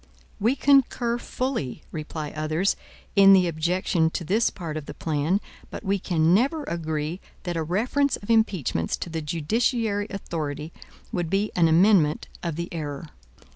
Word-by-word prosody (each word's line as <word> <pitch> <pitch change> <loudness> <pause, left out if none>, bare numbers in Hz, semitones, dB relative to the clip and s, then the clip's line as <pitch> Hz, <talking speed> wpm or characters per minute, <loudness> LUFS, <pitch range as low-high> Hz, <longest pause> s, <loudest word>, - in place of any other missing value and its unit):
"We 230 +6 +2
concur 260 -4 +3
fully," 240 - -3
reply 155 -1 -5
others, 155 +5 0 0.4
"in 195 -1 +8
the 185 -2 +5
objection 170 0 +1
to 170 - -4
this 210 +8 +2
part 165 -5 -6
of 155 -2 -5
the - - -7
plan, 160 +4 0 0.3
but - - -7
we 200 -1 0
can 165 -2 +2
never 275 - +2
agree 160 - -3 0.2
that 175 -2 -3
a 165 - 0
reference 235 - +1
of 205 - -4
impeachments 185 - +1
to 170 - -6
the 160 -1 -3
judiciary 205 - 0
authority 155 -5 -4 0.4
would 175 -3 -2
be 195 +3 0
an 170 -2 +4
amendment 165 -2 +4
of 170 -3 -3
the 170 +1 -3
error. 150 -1 -5
175 Hz, 155 wpm, -25 LUFS, 155-205 Hz, 0.4 s, in